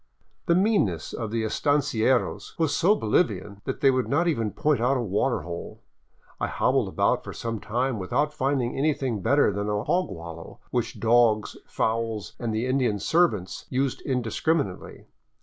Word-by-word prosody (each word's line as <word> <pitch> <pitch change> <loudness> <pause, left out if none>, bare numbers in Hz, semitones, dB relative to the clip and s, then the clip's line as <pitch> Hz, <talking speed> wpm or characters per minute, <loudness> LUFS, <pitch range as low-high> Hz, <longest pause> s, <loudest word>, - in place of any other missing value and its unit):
The 170 - +4
mean 205 - +3
ness 85 -5 -5
of 115 -2 -4
the 115 +1 -1
estancieros 130 0 0
was 160 -3 +1
so 195 +5 +4
Bolivian 105 - 0
that - - -4
they 135 - +6
would 130 -1 0
not 160 +5 +1
even 115 -10 0
point 145 +3 0
out 130 +3 +2
a - - -1
water 115 +4 0
hole. 85 +2 -8 0.6
I - - 0
hobbled - - +1
about - - +1
for - - -7
some 115 -2 -4
time 120 +2 -1
without 140 +11 0
finding 130 -3 0
anything 135 -6 0
better 140 +4 +3
than 100 +1 -3
a 105 0 -1
hog 180 -5 +1
wallow, 85 -3 -9
which 120 -2 -2
dogs, 115 -2 +3
fowls, 110 -3 -2
and 120 -2 -2
the 110 +2 -1
Indian 130 -5 +1
servants 110 - 0
used 135 0 -1
indiscriminately. 125 - -2
120 Hz, 165 wpm, -26 LUFS, 105-140 Hz, 0.6 s, they